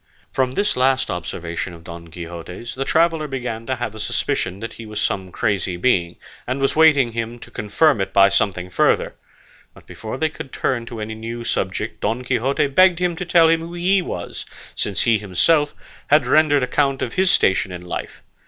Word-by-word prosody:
From 130 Hz, -1 st, 0 dB
this 205 Hz, +8 st, 0 dB
last 130 Hz, +1 st, +2 dB
observation 85 Hz, 0 st, -4 dB
of 80 Hz, -, -15 dB
Don 85 Hz, -1 st, -9 dB
Quixote's, 85 Hz, +6 st, -8 dB
the 135 Hz, +1 st, -3 dB
traveller 165 Hz, -1 st, +2 dB
began 125 Hz, -4 st, -5 dB
to 130 Hz, -, 0 dB
have 120 Hz, -3 st, -4 dB
a 110 Hz, -, -9 dB
suspicion 100 Hz, -2 st, -2 dB
that 115 Hz, +1 st, -6 dB
he 115 Hz, -, -10 dB
was 105 Hz, 0 st, -5 dB
some 95 Hz, -3 st, -2 dB
crazy 95 Hz, -3 st, -1 dB
being, 90 Hz, -5 st, +1 dB, 0.3 s
and 130 Hz, +2 st, -2 dB
was 135 Hz, 0 st, +1 dB
waiting 150 Hz, -6 st, +5 dB
for 115 Hz, -, -12 dB
him 115 Hz, +1 st, -4 dB
to -, -, -13 dB
confirm 105 Hz, +4 st, +2 dB
it 95 Hz, -, -2 dB
by 100 Hz, 0 st, +6 dB
something 95 Hz, -2 st, 0 dB
further; -, -, +2 dB, 0.6 s
but -, -, -17 dB
before 110 Hz, +3 st, -7 dB
they 160 Hz, +3 st, +1 dB
could 135 Hz, -3 st, -9 dB
turn 120 Hz, -3 st, -1 dB
to 115 Hz, -2 st, -6 dB
any 110 Hz, +1 st, -4 dB
new 115 Hz, +2 st, -6 dB
subject 100 Hz, 0 st, -3 dB
Don 120 Hz, +3 st, -1 dB
Quixote 130 Hz, +3 st, +1 dB
begged 175 Hz, +5 st, +4 dB
him 175 Hz, -1 st, 0 dB
to 180 Hz, -, -4 dB
tell 170 Hz, -1 st, +5 dB
him 165 Hz, 0 st, +3 dB
who 170 Hz, +1 st, -7 dB
he 185 Hz, +3 st, +2 dB
was, 90 Hz, -, -6 dB, 0.3 s
since 100 Hz, -4 st, -1 dB
he 115 Hz, -2 st, +3 dB
himself 145 Hz, -, +2 dB, 0.3 s
had 150 Hz, -2 st, +4 dB
rendered 145 Hz, +1 st, +4 dB
account 135 Hz, +1 st, +1 dB
of 120 Hz, -, -4 dB
his 190 Hz, 0 st, +2 dB
station 95 Hz, -, +2 dB
and 90 Hz, 0 st, -8 dB
life. -, -, -6 dB
120 Hz, 200 wpm, -21 LUFS, 95-145 Hz, 0.6 s, by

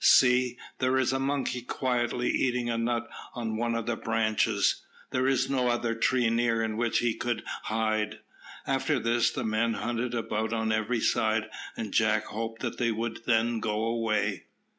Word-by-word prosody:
"See! 125 Hz, -1 st, +5 dB, 0.2 s
there 130 Hz, +1 st, +2 dB
is 130 Hz, -1 st, +2 dB
a 135 Hz, -, 0 dB
monkey 135 Hz, -2 st, -1 dB
quietly 125 Hz, -1 st, -1 dB
eating 125 Hz, -2 st, 0 dB
a 115 Hz, -, -1 dB
nut 120 Hz, 0 st, -1 dB, 0.3 s
on 115 Hz, -3 st, -3 dB
one 115 Hz, +1 st, 0 dB
of 115 Hz, -1 st, -2 dB
the 120 Hz, -, 0 dB
branches. 110 Hz, -1 st, +1 dB, 0.3 s
There 130 Hz, +1 st, +1 dB
is 135 Hz, -1 st, +2 dB
no 130 Hz, -2 st, +1 dB
other 120 Hz, -1 st, +1 dB
tree 120 Hz, +1 st, +2 dB
near 115 Hz, -1 st, +2 dB
in 110 Hz, -1 st, -2 dB
which 120 Hz, +1 st, +1 dB
he 120 Hz, -2 st, +2 dB
could 120 Hz, 0 st, -2 dB, 0.2 s
hide." 110 Hz, -1 st, 0 dB, 0.5 s
After 135 Hz, +2 st, +1 dB
this 115 Hz, 0 st, +2 dB
the -, -, -4 dB
men 110 Hz, +1 st, +1 dB
hunted 120 Hz, +1 st, -2 dB
about 110 Hz, -1 st, -1 dB
on 110 Hz, -1 st, 0 dB
every 110 Hz, +2 st, 0 dB
side, 110 Hz, -2 st, +1 dB, 0.3 s
and 110 Hz, -3 st, -4 dB
Jack 110 Hz, -1 st, +3 dB
hoped 115 Hz, +2 st, -5 dB
that 120 Hz, -, -3 dB
they 115 Hz, -2 st, +2 dB
would 115 Hz, +1 st, -4 dB
then 115 Hz, 0 st, +2 dB
go 105 Hz, 0 st, -1 dB
away. 110 Hz, -4 st, 0 dB
115 Hz, 175 wpm, -28 LUFS, 110-125 Hz, 0.5 s, See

